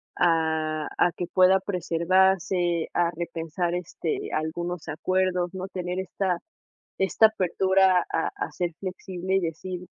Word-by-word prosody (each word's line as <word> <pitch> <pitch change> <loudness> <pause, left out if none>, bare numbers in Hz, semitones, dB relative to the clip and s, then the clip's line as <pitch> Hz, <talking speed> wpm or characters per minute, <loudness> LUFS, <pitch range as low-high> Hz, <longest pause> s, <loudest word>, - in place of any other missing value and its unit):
a 160 -2 +1
a 175 - +4
que 175 - -3
pueda 185 +2 +5
preservarse, 180 -1 +1
a 175 -1 +2
repensar, 170 +1 -3
este, 390 - -4
algunos 170 +2 -3
acuerdos, 180 +2 0
¿no?, 185 0 -5
tener 180 -1 -4
esta 185 -1 -1 0.6
esta 190 +3 +5
apertura 190 -2 +3
a 165 - +1
a - - -3
ser 175 -1 -2
flexible 185 0 -3
y - - +3
decir, 180 +2 -5
180 Hz, 125 wpm, -26 LUFS, 170-190 Hz, 0.6 s, pueda